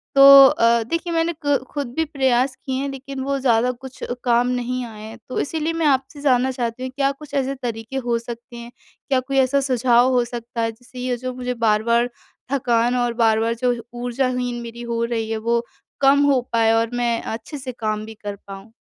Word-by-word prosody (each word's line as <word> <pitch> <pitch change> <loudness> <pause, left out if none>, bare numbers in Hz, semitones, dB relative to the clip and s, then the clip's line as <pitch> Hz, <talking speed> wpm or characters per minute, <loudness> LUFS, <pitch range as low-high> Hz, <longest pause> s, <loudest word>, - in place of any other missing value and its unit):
तो 275 - +6 0.3
अ, 230 -2 +3
देखिए, 335 +8 -3
मैंने 330 +1 +1
क 285 -1 +3
खुद 285 -3 -3
भी 320 - +1
प्रयास 265 -3 +1
किए 265 - -5
हैं, 280 - -2
लेकिन 270 0 -7
वो 275 0 -1
ज़्यादा 245 -1 +2
कुछ 260 +1 -11 0.2
काम 240 0 +3
नहीं 250 0 -2
आए 215 -2 -10
हैं। 220 +1 -9
तो - - -2
इसीलिए 320 +2 -2
मैं 330 -1 -1
आपसे 270 +1 0
जानना 260 -2 +2
चाहती 245 0 -4
हूँ, 260 - -4
क्या 275 -1 +2
कुछ 290 +1 -13
ऐसे 275 -1 0
तरीके 240 0 -5
हो 235 - +2
सकते 235 +1 -9
हैं, 235 0 -9 0.4
क्या 265 - +3
कोई 270 +1 -3
ऐसा 265 +2 +3
सुझाव 250 -1 +3
हो 245 -1 +3
सकता 235 -1 -5
है, 225 0 0
जिससे 245 +3 -14
ये 250 -1 -2
जो 255 +1 -5
मुझे 250 0 -3
बार-बार 235 +3 +2 0.4
थकान 240 -2 +2
और 240 -1 0
बार-बार 225 +1 +2
जो 245 -1 +3 0.2
ऊर्जाहीन 245 0 -2
मेरी 235 0 -8
हो 230 - 0
रही 225 -2 -2
है, 220 - -1
वो 235 +1 0 0.4
कम 275 +1 +5
हो 275 -3 +3
पाए 225 -1 +4
और 225 0 +2
मैं 240 -1 0
अच्छे 225 +7 -6
से 260 -1 -6
काम 215 -3 -3
भी 220 - -9
कर 205 -1 -4
पाऊँ? 195 +2 -10
245 Hz, 205 wpm, -21 LUFS, 235-270 Hz, 0.4 s, तो